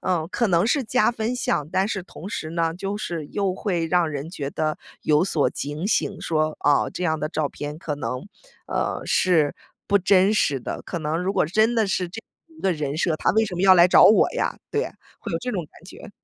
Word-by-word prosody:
嗯， 175 -4 0
可 235 - +1
能 175 0 +2
是 270 +3 +2
加 250 +1 +2
分 230 +1 -2
项， 150 -11 -1
但 190 +2 +1
是 195 -3 -3
同 175 -1 -11
时 180 -6 -4
呢， 165 0 0
就 195 +4 -4
是 170 -7 -4
又 195 +2 -1
会 180 -4 -1
让 175 0 +2
人 145 +2 -5
觉 145 -6 -4
得 155 +1 -2 0.2
有 150 +1 +3
所 170 -6 +1
警 150 +5 -4
醒， 205 -2 0
说： 155 -1 0
“啊， 145 -1 +3
这 180 - -5
样 160 -2 0
的 150 - -1
照 155 -2 -1
片 145 +1 -6
可 155 -3 -4
能， 125 +1 -4 0.4
呃， - - -2
是 165 -6 +2 0.3
不 200 - +4
真 190 +1 +4
实 145 -10 +1
的”。 120 - -5
可 175 - -4
能 155 +1 -2
如 185 - 0
果 - - +3
真 220 +9 +2
的 225 -2 +2
是 185 -2 -1
这 215 +6 -8
样 320 +7 -26
一 - - -13
个 190 - +2
人 150 -3 -3
设， 160 -1 +1
他 - - +1
为 220 +3 +3
什 195 -4 -6
么 175 - -1
要 190 -1 +8
来 175 0 +6
找 - - +7
我 215 - +6
呀？ - - -1
对 435 - 0
呀， - - -5 0.3
会 - - -6
有 - - 0
这 250 - -3
种 185 -7 -3
感 155 - -20
觉。 195 +3 -12
175 Hz, 255 characters per minute, -23 LUFS, 155-200 Hz, 0.4 s, 要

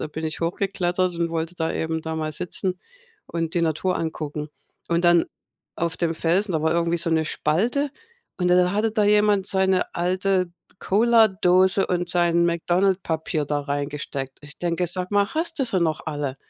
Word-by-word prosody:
da - - -2
bin 160 +1 -6
ich 155 +1 -4
hochgeklettert 180 0 -1
und 170 - 0
wollte 165 +1 -3
da 160 -1 -2
eben 160 0 -2
da 160 0 -4
mal 155 -1 -3
sitzen 180 +3 -2 0.5
und 165 -1 -3
die 170 - +1
Natur 165 +3 0
angucken. 155 -2 -4 0.4
Und 170 +1 +1
dann 175 -1 +5 0.5
auf 170 -1 -2
dem 165 -2 -1
Felsen, 185 +6 +2
da 155 -2 0
war 160 - +2
irgendwie 170 0 +1
so 170 0 0
'ne 160 -1 +2
Spalte 230 - 0 0.5
und 180 -1 +1
dann 180 0 +4
hatte 215 +2 +1
da 215 -1 +1
jemand 210 -1 +3
seine 190 -1 +1
alte 185 +1 +1 0.3
Cola-Dose 195 -4 +4
und 175 -1 -1
sein 170 -1 +2
McDonalds 180 +3 +1
Papier 160 -1 -2
da 145 0 -1
reingesteckt. 140 -1 -4
Ich 150 +1 -6
denke: 175 0 -1
„Sage 180 +1 -3
mal, 205 0 +3
hast 325 0 -1
du 270 - +2
sie 200 -6 +2
noch 160 -2 0
alle, 145 -3 -3
175 Hz, 180 wpm, -23 LUFS, 160-190 Hz, 0.5 s, dann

